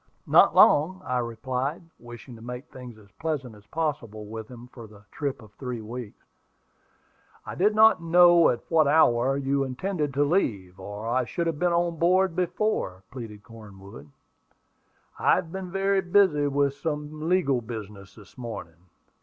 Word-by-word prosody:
"Not - - +5
long," 175 +6 +5
I 125 0 -1
replied, 125 +6 -3 0.2
wishing 120 +1 -11
to 115 - -14
make 125 +3 -7
things 125 -3 -11
as 100 -2 -19
pleasant 145 -7 -3
as 105 0 -18
possible 135 -10 -4
with 110 +1 -8
him 120 -1 -11
for 115 -3 -10
the 105 -1 -17
trip 140 -4 -4
of 105 - -16
three 125 -3 -5
weeks. 115 0 -9 1.2
"I - - -6
did 210 +4 +2
not 220 -4 +6
know 175 0 +6
at 120 - -1
what 160 -3 +3
hour 135 -3 +3
you 140 0 0
intended 150 +3 -3
to 145 - +3
leave, 105 - -1
or 105 +2 -7
I 125 +2 0
should 170 +8 -3
have 165 -3 -2
been 180 +1 +2
on 170 -1 0
board 185 +1 +2
before," 180 - -2
pleaded 110 -5 -9
Cornwood. 100 - -13 1.1
"I - - +4
have 160 - -4
been 190 0 -6
very 195 +1 +1
busy 175 -6 +3
with 140 0 +1
some 150 +1 -4
legal 140 -9 +2
business 105 -4 -9
this 105 +3 -17
morning." 90 -7 -8
135 Hz, 160 wpm, -26 LUFS, 115-165 Hz, 1.2 s, not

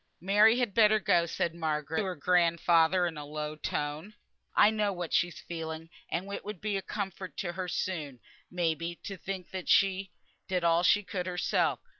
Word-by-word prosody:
"Mary 210 +5 +5
had 245 -5 0
better 215 0 +5
go," 170 -4 +2
said 170 0 -1
Margaret 160 -1 -2
to - - +1
her 185 -1 -3
grandfather, 170 +1 +3
in 165 -3 -3
a - - -6
low 150 +1 -5
tone, 155 +6 -4 0.4
"I 210 - +6
know 210 -2 0
what 175 -3 -5
she's 175 -3 +1
feeling, 160 0 -6 0.2
and 190 +4 -3
it - - -5
will 210 - -5
be 205 +3 -3
a 195 - -1
comfort 190 -2 -5
to 175 - -2
her 185 0 -4
soon, 155 -8 -3 0.3
may 175 -2 0
be, 165 +2 -5
to 195 - -5
think 190 -1 -6 0.2
she 195 0 +3 0.4
did 180 -2 -1
all 170 0 +4
she 200 +4 +4
could 185 -2 -4
herself. 180 -1 0
175 Hz, 185 wpm, -30 LUFS, 165-195 Hz, 0.4 s, I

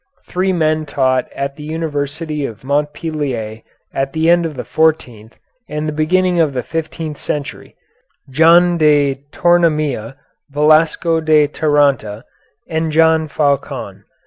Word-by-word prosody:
Three 185 +1 -1
men 155 -3 0
taught 130 -3 0
at 140 0 -4
the 150 - -9
University 155 -1 -4
of 115 -4 -6
Montpellier 145 -6 -3 0.3
at 135 0 -2
the 160 +1 +2
end 170 -1 +3
of 155 - -9
the 125 - -5
fourteenth 125 -9 -1 0.3
and 150 +1 -3
the - - -1
beginning 175 +3 +1
of 155 -4 +2
the 125 -2 -3
fifteenth 160 -2 -5
century, 145 -2 -5 0.5
John 170 +5 +4
de 145 -3 +2
Tornamira, 155 -8 +1 0.4
Valesco 155 +3 +2
de 155 -1 +4
Taranta, 140 -9 0 0.4
and 160 0 -2
John 160 0 +3
Faucon. 140 -2 -2
150 Hz, 125 wpm, -17 LUFS, 140-160 Hz, 0.5 s, John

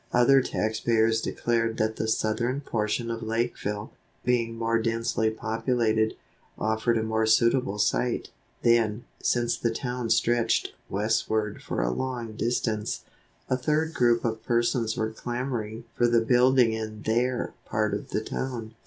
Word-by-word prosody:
Other 130 +3 +5
tax 110 -3 -1
payers 110 -1 +2
declared 115 -1 0
that 110 0 0
the 110 - -1
southern 120 +5 0
portion 115 -2 -1
of 115 0 -4
Lakeville, 110 -2 -2 0.3
being 115 -2 +1
more 115 0 +1
densely 115 -1 0
populated, 110 0 0 0.4
offered 110 +2 +1
a 110 - 0
more 110 0 0
suitable 115 -1 +3
site. 120 +3 0 0.3
Then, 115 -1 +3 0.2
since 120 -1 +1
the 115 - 0
town 125 0 -3
stretched 115 +1 +2 0.2
westward 105 0 0
for - - -2
a - - +1
long 120 - -4
distance, 110 -2 -1 0.4
a 130 - +1
third 155 +5 0
group 120 -5 +3
of 110 -1 -1
persons 120 -1 +1
were 110 0 -1
clamoring 120 -2 -4
for 120 - +2
the 120 -1 +4
building 125 0 +4
in 110 -1 -5
their 120 +3 0
part - - 0
of - - -4
the - - -1
town. 120 -4 -4
115 Hz, 145 wpm, -27 LUFS, 110-120 Hz, 0.4 s, Other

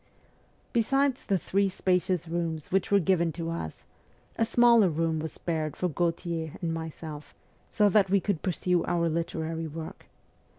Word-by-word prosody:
Besides 270 +3 +2
the 195 - +1
three 195 +3 +1
spacious 180 -2 0
rooms 165 -2 -3
which 190 0 +1
were 200 - +5
given 170 -1 +2
to 165 0 -4
us, 80 - -6 0.5
a - - +1
smaller 235 -3 +5
room 160 0 0
was 160 0 -4
spared 155 -3 -3
for 180 - 0
Gautier 165 -1 -2
and 165 -2 -2
myself, 160 -2 -7 0.3
so 210 -2 +3
that 200 -1 +4
we 200 +1 +4
could 190 -4 -2
pursue 180 -1 0
our 170 -1 +1
literary 165 0 -2
work. 160 +1 -8
170 Hz, 155 wpm, -28 LUFS, 160-195 Hz, 0.5 s, were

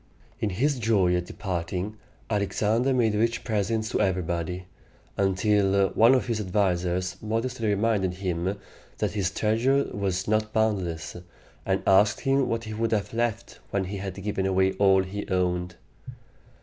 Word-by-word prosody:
In 110 - 0
his 130 +8 0
joy 100 -6 +3
at 90 0 -2
departing, 90 +2 -4 0.3
Alexander 105 +4 +1
made 120 -4 +2
rich 115 +2 0
presents 110 0 -1
to - - 0
everybody, 90 -2 -1 0.5
until 100 0 +2
one 115 +4 +5
of 130 - +1
his 115 -3 -1
advisers 90 -2 0
modestly 115 +2 -2
reminded 100 -3 +1
him 90 +1 -2 0.4
that - - -1
his 100 -3 0
treasure 115 +8 +2
was 95 -2 -2
not 110 0 0
boundless, 95 -8 -1 0.5
and - - 0
asked 100 +2 +4
him 135 -1 +2
what 115 0 -1
he 110 -1 -6
would 115 +1 -1
have 105 -1 -1
left 115 -1 -2
when 100 -1 0
he 100 +2 -5
had 95 -1 -5
given 100 -2 -1
away 95 0 +2
all 95 -1 +5
he 100 +2 -6
owned. 90 -1 0
100 Hz, 150 wpm, -26 LUFS, 95-110 Hz, 0.5 s, one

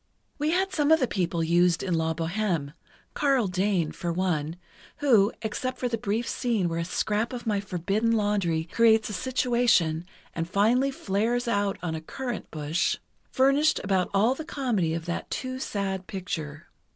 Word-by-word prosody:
"We 300 +1 +1
had 380 +3 +1
some 295 -4 +2
of 320 - +6
the 255 - +1
people 175 -5 -1
used 175 +1 +3
in 185 - -1
'La 160 0 0
Bohême'—Karl 180 - -1
Dane, 185 -3 0
for 170 +2 -3
one, 165 -3 -1 0.4
who, 230 -8 +4
except 255 +4 -3
for 250 - -1
the 235 - -1
brief 215 +3 -1
scene 230 -8 0
where 165 0 -2
a 170 - -1
scrap 210 +5 -1
of 245 -2 -6
my 210 -3 +1
forbidden 200 +4 -1
laundry 205 -7 +1
creates 220 +6 +3
a - - -5
situation 235 -7 +1 0.3
and 165 0 -3
finally 230 +8 +3
flares 235 0 -1
out 205 -3 0
on 165 -2 -2
a 160 - -4
currant 245 +8 -5
bush—furnished 260 - 0
about 190 -3 +1
all 210 +5 +3
the 315 - -6
comedy 225 - -1
of 165 -1 -5
that 170 0 -4
too 255 0 -4
sad 195 -5 -3
picture. 165 -6 -5
200 Hz, 165 wpm, -27 LUFS, 170-245 Hz, 0.4 s, of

